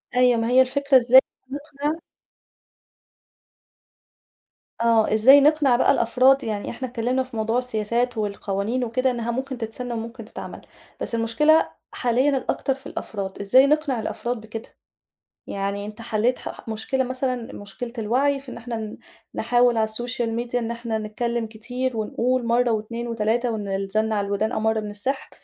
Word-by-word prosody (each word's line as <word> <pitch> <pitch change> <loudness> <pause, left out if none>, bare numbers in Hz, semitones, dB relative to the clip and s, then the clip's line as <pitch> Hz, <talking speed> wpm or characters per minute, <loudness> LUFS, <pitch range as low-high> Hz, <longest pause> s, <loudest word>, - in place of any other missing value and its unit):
أيوه، 250 -2 +4
ما 225 - 0
هي 255 +1 +6
الفكرة 275 +1 +3
إزاي 250 +2 +7 0.3
هنقنِع 290 +2 -3 2.8
آه، 225 -2 +3
إزاي 265 +6 +7
نقنِع 295 -4 +4
بقى - - +4
الأفراد، 260 +4 +4
يعني 210 -2 -3
إحنا 255 +2 -4
اتكلمنا 250 +2 -1
في 255 -2 -12
موضوع 225 +2 0
السياسات 240 0 0
والقوانين 205 +3 -2
وكده 255 +2 +1
إنها 235 -1 -2
ممكن 260 +1 -4
تتسن 235 +2 -5
وممكن 230 0 -6
تتعمل، - - -9 0.4
بس 230 - -1
المشكلة 300 +8 +3 0.2
حاليًا 255 +3 +1
الأكتر 270 +1 -1
في 270 +1 -14
الأفراد، 195 -2 -5
إزاي 255 +7 +5
نقنع 295 -5 +1
الأفراد 235 +1 -3
بكده؟ 220 +1 -8 0.8
يعني 200 +1 -3
أنت 215 +2 -9
حليت 230 +3 0
ح - - -6
ح - - -11
مشكلة 240 +5 -1
مثلًا 255 -2 -3
مشكلة 220 +4 -7
الوعي 265 +6 +1
في 270 -2 -11
إن - - -8
إحنا 230 0 -5
ن 215 -1 -6 0.4
نحاول 245 -1 +3
على 220 0 +2
الSocial 240 +2 -2
Media 240 0 -4
إن 235 -1 0
إحنا 235 -1 -3
نتكلم 230 +2 -2
كتير 245 +2 -4
ونقول 240 +3 0
مرة 240 0 +2
و2 230 +2 -3
و3 230 +2 0
وإن 210 -2 -4
الزن 195 +3 -1
على 200 -2 0
الودان 205 +2 0
أمَر 220 0 0
من 210 - -5
السحر، 230 +7 -3
235 Hz, 155 wpm, -23 LUFS, 220-255 Hz, 2.8 s, إزاي